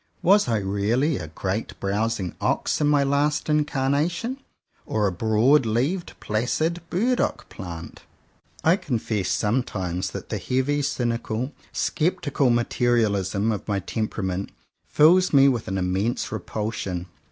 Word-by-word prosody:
Was 200 0 +5
I 115 -2 +2
really 105 +9 0
a 80 - -6
great 95 +7 -4
browsing 100 -2 -1
ox - - 0
in 150 - +3
my 145 -1 +4
last 145 +2 +1
incarnation, 150 - 0 0.5
or 105 -1 +1
a 100 - +2
broad 110 - +3
leaved 140 - -1
placid 155 +10 -1
burdock 245 +8 0
plant? 85 -3 -8 0.6
I 165 +4 +5
confess 110 - -2
sometimes 95 -5 -1
that - - -8
the - - -2
heavy, 130 +3 0
cynical, 120 -1 -2 0.2
sceptical 150 -5 0
materialism 115 -4 +1
of 105 - -4
my 100 -2 0
tem 110 +3 -2
perament 95 -2 -3 0.4
fills 180 +4 +5
me 140 -1 +7
with 125 -5 0
an 95 - -2
immense 95 +6 -1
repul 110 +1 -3
sion. 90 -4 -4
115 Hz, 130 wpm, -24 LUFS, 100-145 Hz, 0.6 s, me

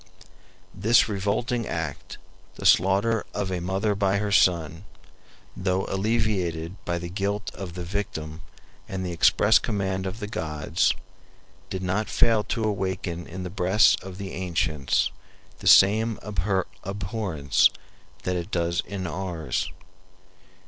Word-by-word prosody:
This 110 +5 +4
revolting 110 +3 -1
act, 80 -4 -4 0.4
the - - -8
slaughter 100 +5 +4
of 100 -2 -2
a 90 - -1
mother 95 +4 0
by 100 -1 +1
her 105 0 -1
son, 85 -4 +3 0.7
though 95 0 0
alleviated 95 -5 -1
by 85 0 -1
the 85 0 -5
guilt 100 +3 -2
of 90 -3 -7
the 90 - -4
victim 85 -4 -4 0.5
and 95 -1 -3
the 90 - -3
express 105 +6 +5
command 95 -3 -2
of 95 +4 -6
the 105 - -4
gods, 80 -1 0 0.7
did 95 0 -4
not 95 +4 -1
fail 115 -3 +3
to 115 - -2
awaken 95 -4 -2
in 95 +2 -6
the 90 - -5
breasts 95 +3 +4
of 95 0 -9
the 100 -1 -6
ancients 80 -6 0 0.5
the - - -5
same 110 +3 +6
abhorrence 95 - 0 0.5
that 90 - -1
it 90 +3 -3
does 85 -3 0
in 100 -2 -4
ours. 85 -6 -3
95 Hz, 130 wpm, -25 LUFS, 85-105 Hz, 0.7 s, same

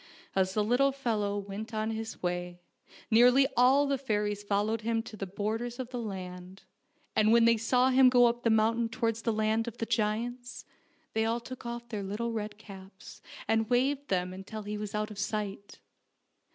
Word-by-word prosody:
As 190 0 +1
the 210 - +2
little 250 +6 +3
fellow 220 -7 -1
went 205 +3 -6
on 215 +1 -1
his 225 -2 -6
way 175 0 -3 0.5
nearly 245 +4 +6
all 265 +4 +5
the 275 -1 0
fairies 210 -5 -1
followed 205 +2 0
him 225 0 -1
to 230 -2 -10
the 195 -2 -5
borders 220 +5 -3
of 255 -2 -5
the 245 - -4
land, 185 -2 -7 0.5
and 215 0 +4
when 230 0 +6
they 230 0 +5
saw 250 +3 +2
him 260 0 +6
go 245 -1 +6
up 240 0 +1
the 230 - +2
mountain 225 +1 +2
towards 230 -1 -1
the 230 - 0
land 220 +1 0
of 235 0 -6
the 225 - -2
giants, 235 +3 -2 0.5
they 220 - +1
all 225 +1 0
took 250 +1 -9
off 235 0 -6
their 215 -3 -4
little 210 +4 -3
red 215 -2 -4
caps 195 -2 -13 0.3
and 225 -1 +1
waved 270 +3 +1
them 180 -1 -1
until 205 +3 -7
he 210 +1 -4
was 210 0 -5
out 210 0 -2
of 205 - -8
sight. 200 -1 -4
220 Hz, 190 wpm, -30 LUFS, 205-240 Hz, 0.5 s, nearly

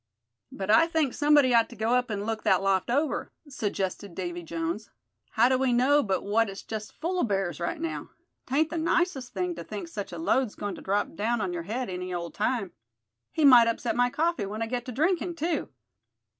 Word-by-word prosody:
"But 195 +1 -2
I 230 +9 +6
think 320 -6 0
somebody 290 -3 +4
ought 230 -1 +4
to 240 - -11
go 220 +2 0
up 250 -1 +2
and 205 -1 -3
look 225 0 -2
that 190 0 +3
loft 195 0 +1
over," 285 +4 0 0.2
suggested 200 -7 -3
Davy 175 -2 -4
Jones. 170 +5 -4 0.4
"How 230 +2 +5
do 260 0 +2
we 265 -1 +2
know 265 +5 +4
but 195 -7 -1
what 215 +2 +2
it's 195 0 -8
just 215 -1 -7
full 360 +3 -1
of - - +1
bears 195 -4 -1
right 300 - -2
now. 330 0 -4 0.4
'Tain't 300 +4 +1
the 335 - -2
nicest 320 -5 0
thing 180 -2 -2
to 170 0 -7
think 195 0 -6
such 200 +4 -6
a 170 - -6
load's 215 +8 +1
goin' 205 -1 -4
to - - -9
drop 200 +2 -1
down 225 +7 0
on 185 -4 -2
your 175 - -3
head 245 +3 -2
any 180 0 -5
old 170 -1 -4
time. 210 -3 -1 0.6
He 315 - +2
might 245 -4 +8
upset 230 +1 -1
my 245 0 +3
coffee 325 -5 0
when 215 +3 -3
I - - 0
get 245 +1 -3
to 255 - -5
drinkin', 340 +6 0
too." 330 -1 -2
225 Hz, 215 wpm, -27 LUFS, 195-270 Hz, 0.6 s, might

